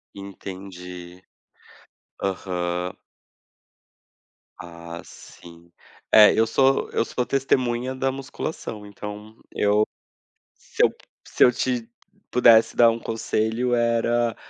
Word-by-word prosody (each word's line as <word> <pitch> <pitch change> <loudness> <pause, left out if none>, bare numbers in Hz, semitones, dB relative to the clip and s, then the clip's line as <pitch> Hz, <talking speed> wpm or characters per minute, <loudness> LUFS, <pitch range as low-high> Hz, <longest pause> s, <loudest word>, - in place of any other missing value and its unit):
Entendi. 90 -2 -9 1.0
Aham. 90 -2 -2 1.6
Ah, 85 0 -9
sim. 85 0 -15 0.4
É, 105 -1 +8
eu 115 - +4
sou 135 +4 +2
eu - - 0
sou 125 - -2
testemunha 130 -2 0
da 135 0 0
musculação. 135 -5 -6
Então 105 +1 -9 0.2
eu, 105 +1 +2 0.7
se - - -4
eu - - +6 0.4
se - - +3
eu 125 - +5
te 120 -2 -2 0.4
pudesse 115 -2 +5
dar 115 -1 +6
um 115 - -3
conselho, 115 +2 -1
era 115 0 +1
110 Hz, 100 wpm, -23 LUFS, 90-120 Hz, 1.6 s, É